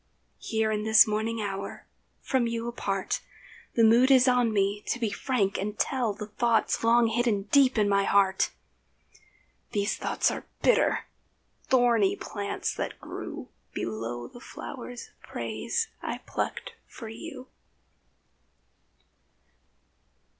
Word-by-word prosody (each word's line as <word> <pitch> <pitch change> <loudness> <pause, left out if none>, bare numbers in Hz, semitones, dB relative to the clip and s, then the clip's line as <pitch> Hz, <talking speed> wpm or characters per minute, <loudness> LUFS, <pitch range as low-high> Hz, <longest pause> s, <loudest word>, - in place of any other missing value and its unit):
Here 220 -1 0
in 210 -1 0
this 220 +1 +7
morning 220 +1 -1
hour, 195 0 -5 0.4
from 255 -3 +1
you 230 0 -3
apart, 195 -5 -2 0.5
The 230 - +4
mood 235 +4 +6
is 260 -1 +6
on 245 -2 +3
me 200 0 +1
to - - 0
be 225 -4 -1
frank 205 -4 0
and 210 +2 -3
tell 250 -5 0
The 210 +1 -6
thoughts 225 +2 +1
long 235 +1 +5
hidden 225 -3 +1
deep 275 -2 +5
down 215 - +3
in - - +1
my 200 0 +3
heart. 195 -1 +3 1.2
These 205 0 0
thoughts - - +1
are - - -6 0.2
bitter—thorny 245 - +1
plants, 200 -1 -3
that - - -4
grew - - -7 0.3
Below 115 +2 -4
the 245 - -13
flowers 245 -3 -8
of - - -35
praise 460 -1 -2
I - - -3
plucked - - -3 0.2
for 230 - -9
you. 255 +3 -9
225 Hz, 125 wpm, -28 LUFS, 200-245 Hz, 1.2 s, this